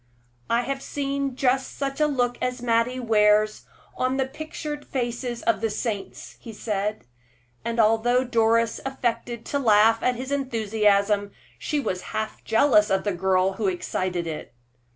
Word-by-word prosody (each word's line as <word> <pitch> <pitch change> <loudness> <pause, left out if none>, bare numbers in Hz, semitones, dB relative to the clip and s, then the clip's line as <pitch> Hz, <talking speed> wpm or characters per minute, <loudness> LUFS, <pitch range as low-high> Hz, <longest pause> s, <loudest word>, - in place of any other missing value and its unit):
"I 235 +1 +3
have 275 +1 -3
seen 275 -2 -2
just 265 0 0
such 275 +1 -3
a 300 - +5
look 245 -4 0
as 250 0 -1
Mattie 235 +2 +1
wears 215 -2 +3 0.3
on 255 +1 0
the 265 - +1
pictured 300 +1 -6
faces 240 -1 -3
of 220 -3 +1
the 225 - +1
saints," 210 -2 -5
he 225 - -10
said; 210 0 -3 0.6
and 235 0 -2
although 225 +3 +3
Doris 230 -1 +2
affected 240 -3 -3
to 285 - -1
laugh 225 -2 +4
at 250 - +1
his 260 +3 -6
enthusiasm, 210 -6 +1 0.3
she 300 - -1
was 185 -9 -2 0.2
half 220 0 -4
jealous 225 -3 +4
of 190 0 +1
the 205 - 0
girl 185 +1 +2
who 215 - 0
excited 180 -1 -2
it. 155 -6 -6
230 Hz, 150 wpm, -25 LUFS, 210-260 Hz, 0.6 s, a